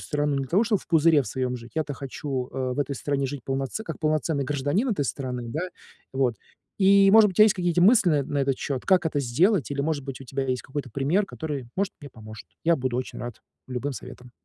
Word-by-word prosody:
страну 145 -1 -1
не 140 - 0
для 135 - -5
того, 200 - +3
чтобы 210 -3 +1
в - - -17
пузыре 160 -3 +4
в - - -10
своем 125 +3 -2
жить. 115 0 -12
Я-то 155 -2 -2
хочу, 135 -1 -4
э, 130 -1 -2
в - - -8
этой 140 -1 -1
стране 140 0 -1
жить 135 -2 -6
полноце 135 - -3
как 165 - -6
полноценный 155 -2 0
гражданин 145 - 0
этой 190 -11 0
страны, 125 -3 -4
да. 150 +8 -3 0.5
Вот, 130 -3 +1 0.4
и, 195 0 +6
может 215 0 +7
быть, 185 - -6
у - - -7
тя - - +10
есть 215 -1 +4
какие-нить 175 -2 0
мысли 205 0 +6
на 145 -2 +2
на 140 +1 -3
этот 135 -1 0
счёт, 135 -3 -3
как 180 -3 +3
это 145 -2 0
сделать, 150 - +2
или, 140 0 -2
может 145 -2 -1
быть, 135 -1 -7
у 135 - -9
тебя 135 +1 -3
есть 130 -1 -1
какой-то 135 -1 -6
пример, 145 - +1
который, 145 -9 -5
может, 195 0 0
мне 145 -3 -10
поможет. 110 -1 -11 0.2
Я 170 0 +4
буду 130 -3 -2
очень 130 - -5
рад 120 -2 -7 0.3
любым 130 +3 -3
советам. 125 -1 -10
140 Hz, 240 wpm, -25 LUFS, 130-170 Hz, 0.5 s, тя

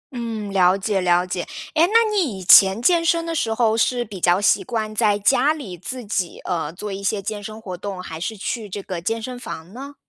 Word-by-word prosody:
嗯， 225 -4 -4
了 185 -1 +4
解 195 0 -1
了 175 0 +2
解。 180 -1 -3 0.3
诶， 330 +2 +4
那 455 +2 +4
你 295 - 0
以 185 - -8
前 190 +3 +7
健 340 +5 +3
身 335 0 +1
的 330 - -3
时 235 -8 -1
候 225 -1 +2
是 240 +2 +1
比 200 -3 -9
较 175 +2 +3
习 205 - +3
惯 220 -3 -3
在 210 -2 +3
家 270 +8 +3
里 260 - -8
自 240 +7 -6
己， 185 -4 -3
呃， 165 -4 -2
做 195 +4 -6
一 195 - -7
些 200 +1 0
健 205 0 -5
身 215 0 -8
活 190 -5 -7
动， 195 0 -6
还 160 -2 -7
是 215 +5 -4
去 215 +1 -4
这 200 +1 -6
个 180 -3 -5
健 225 +6 -2
身 250 +2 -6
房 170 -4 -8
呢？ 275 +3 -9
210 Hz, 250 characters per minute, -21 LUFS, 185-245 Hz, 0.3 s, 前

